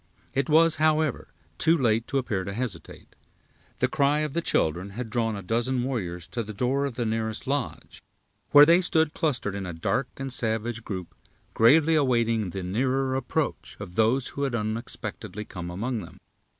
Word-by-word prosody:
It 135 +4 0
was, 160 +1 +5
however, 155 -2 +1 0.3
too 165 +1 +4
late 115 -4 +1
to 140 - -1
appear 110 -8 -1
to 100 - -5
hesitate. 105 -7 -6 0.6
The - - +2
cry 145 +2 +2
of 150 -2 -2
the 170 - 0
children 90 - 0
had 120 -3 -5
drawn 115 -1 0
a 100 - -6
dozen 120 +5 0
warriors 90 -10 -3
to 120 - -3
the 110 -1 -7
door 130 +5 +1
of 135 -4 -4
the 120 -1 -1
nearest 110 0 -2
lodge, 140 -2 -3 0.5
where 145 0 +9
they 170 +3 +5
stood 160 -3 +1
clustered 130 - -1
in 100 -2 -4
a 90 - -5
dark 125 +10 -1
and 135 -1 -4
savage 115 -1 -2
group, 90 -6 -6 0.4
gravely 150 +8 +5
awaiting 115 - +2
the 95 +2 -5
nearer 130 +7 0
approach 135 -2 -2
of 90 - -8
those 115 +6 +2
who 140 - -6
had 135 -4 0
unexpectedly 110 -1 -4
come 90 -3 -7
among 115 +7 -3
them. 85 - -12
120 Hz, 175 wpm, -26 LUFS, 105-140 Hz, 0.6 s, where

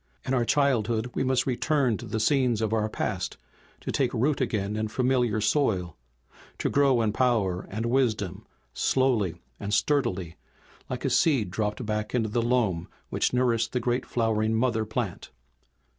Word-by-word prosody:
In 130 - -1
our 120 -2 +2
childhood 120 -3 +1
we - - 0
must 130 -1 +1
return 130 -1 +1
to - - -9
the 110 - -2
scenes 125 -1 +2
of 110 -1 0
our 110 -1 +1
past, - - -3 0.4
to - - -4
take 130 -3 +1
root 135 +5 +1
again 105 -4 -1
in 110 0 -1
familiar 125 -2 +1
soil, 105 - +1 0.6
to - - -1
grow 135 -4 +3
in 105 -2 0
power 110 -8 +1
and 110 +3 -3
wisdom 110 -5 0 0.3
slowly 115 - +1 0.2
and 100 0 -1
sturdily, 100 - 0 0.5
like - - -4
a - - +2
seed 130 - +2
dropped 105 +3 -2
back 105 +1 -2
into 110 -3 +1
the 115 +3 0
loam 115 -8 +1 0.2
which - - 0
nourished 120 -3 +1
the 125 - +1
great 120 +1 -1
flowering 110 -1 +1
mother 115 -2 +1
plant. 110 -3 -4
115 Hz, 160 wpm, -27 LUFS, 105-125 Hz, 0.6 s, grow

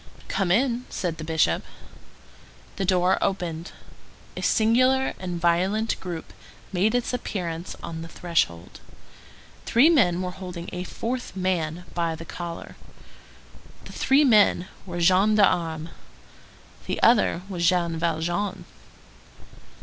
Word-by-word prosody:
"Come 195 -3 -1
in," 240 +5 +2
said 165 -3 -3
the - - -5
Bishop. 155 - +1 1.1
The 195 - -1
door 180 0 +3
opened. 175 -3 -2 0.6
A - - -5
singular 255 +4 +3
and 180 -2 -4
violent 185 +6 +1
group 175 -3 -7 0.4
made 205 +6 +2
its 245 0 -1
appearance 175 -8 -4
on 165 -1 -5
the 165 - -7
threshold. 165 - -2 0.9
Three 275 +8 +5
men 185 - +3
were 180 - -3
holding 180 -2 -8
a 180 0 -4
fourth 245 +5 -4
man 180 -3 -1
by 170 -2 -1
the 165 +1 -9
collar. 170 -1 -7 1.1
The - - -10
three 275 +3 +3
men 210 -7 +4 0.2
were 175 -1 -5
gendarmes; 185 -4 +3 1.0
the - - -3
other 210 -6 +4
was 175 -3 +1
Jean 170 -2 0
Valjean. 175 +4 -2
180 Hz, 120 wpm, -25 LUFS, 170-210 Hz, 1.1 s, Three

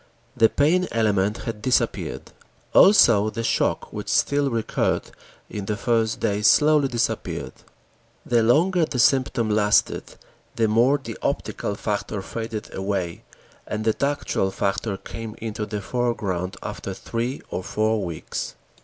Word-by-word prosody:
The 115 - +5
pain 175 +5 +2
element 105 -2 +1
had 115 -3 -5
disappeared. 130 +3 -1 0.4
Also 115 - +6
the 115 +1 -4
shock, - - 0
which - - -5
still 140 -1 +2
recurred 115 -3 -1 0.4
in 105 -2 -6
the 105 +1 -2
first 115 -2 0
days 105 -1 +1
slowly 150 -2 +5
disappeared. 120 -3 -2 0.7
The 120 -1 +3
longer 165 +10 +3
the 145 -4 -5
symptom 120 -3 +2
lasted, 105 0 +1 0.4
the 115 -1 +2
more 120 +6 +4
the 115 -5 -8
optical 100 - -2
factor 105 -1 -3
faded 110 0 -6
away, 95 -3 -3 0.5
and 110 0 -3
the 110 - +3
tactual 140 -8 -1
factor 100 +1 -2
came 115 +1 -8
into 110 -2 -4
the 105 -1 -4
foreground 100 -6 -2
after - - -5
three 120 +3 -4
or 95 - -3
four 110 +2 0
weeks. 85 -3 -5
110 Hz, 135 wpm, -23 LUFS, 105-125 Hz, 0.7 s, Also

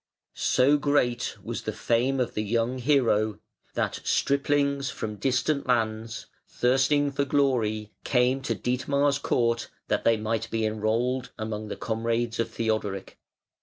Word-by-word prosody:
So 140 +3 +3
great 140 -4 +1
was - - -4
the - - -3
fame 125 +3 +1
of 125 - -1
the 105 - -1
young 115 +4 0
hero 115 -6 +2 0.4
that - - -1
striplings 140 -1 +1
from 105 -1 -5
distant 135 +6 0
lands, 115 -2 -1 0.2
thirsting 135 +3 +2
for 140 +1 0
glory, 115 -7 +1
came 125 +1 +2
to 115 -3 -1
Dietmar's 140 +6 +1
court 115 -4 0 0.2
that - - +1
they 115 -1 +4
might 110 +1 -2
be 115 -1 0
enrolled 115 +4 0
among 110 -1 -4
the - - -4
comrades 115 +1 -1
of 115 - 0
Theodoric. 110 -4 -2
120 Hz, 135 wpm, -27 LUFS, 110-135 Hz, 0.4 s, they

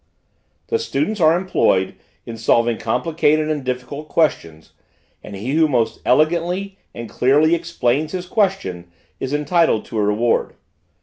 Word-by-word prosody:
The 455 - +1
students 220 - -2
are 160 +1 +5
employed 135 - +1 0.3
in 115 - -7
solving 115 +1 +1
complicated 155 +3 +1
and 150 -3 -3
difficult 130 +4 -5
questions, 80 - -1 0.5
and 100 - -9
he 110 +7 -4
who 160 +2 +3
most 120 -6 -1
elegantly 175 +8 +1 0.2
and 120 0 -6
clearly 145 +9 +3
explains 155 -4 -1
his 180 -1 -4
question, 180 - -1 0.3
is 130 - -4
entitled 150 -4 +1
to 110 - -4
a - - +2
reward. 105 +3 0
150 Hz, 135 wpm, -20 LUFS, 115-170 Hz, 0.5 s, are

